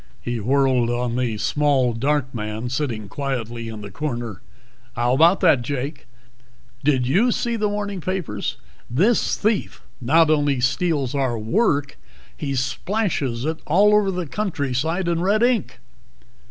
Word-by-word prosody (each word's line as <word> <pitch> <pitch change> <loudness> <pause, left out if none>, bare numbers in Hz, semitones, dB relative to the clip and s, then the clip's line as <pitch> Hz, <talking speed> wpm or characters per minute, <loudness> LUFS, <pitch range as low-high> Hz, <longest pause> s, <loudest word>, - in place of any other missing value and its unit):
He 120 -1 -3
whirled 130 +1 +2
on 120 0 -1
the 125 -4 -1
small 135 +1 +2
dark 135 +2 0
man 110 +1 -4
sitting 120 -6 -3
quietly 120 -1 -4
in 110 -1 -7
the 100 -1 -8
corner. 120 -5 -4 0.5
"How 120 0 +1
about 165 +7 +5
that, 160 -9 +5
Jake? 140 +3 -4 0.8
Did 130 -3 +2
you 195 - +3
see 235 0 -1
the 215 -2 0
morning 205 -2 -3
papers? 165 - -3 0.3
This 195 - +2
thief 215 0 -1 0.2
not 155 +6 +4
only 145 -3 +2
steals 135 +1 0
our 130 -4 0
work, 140 - 0 0.4
he 140 -2 -3
splashes 135 - -1
it 160 +1 -2
all 200 +7 +5
over 210 -2 +4
the 180 -2 -2
countryside 160 -1 -2
in 170 -1 0
red 205 +5 +2
ink." 240 -5 +1
140 Hz, 140 wpm, -22 LUFS, 120-180 Hz, 0.8 s, about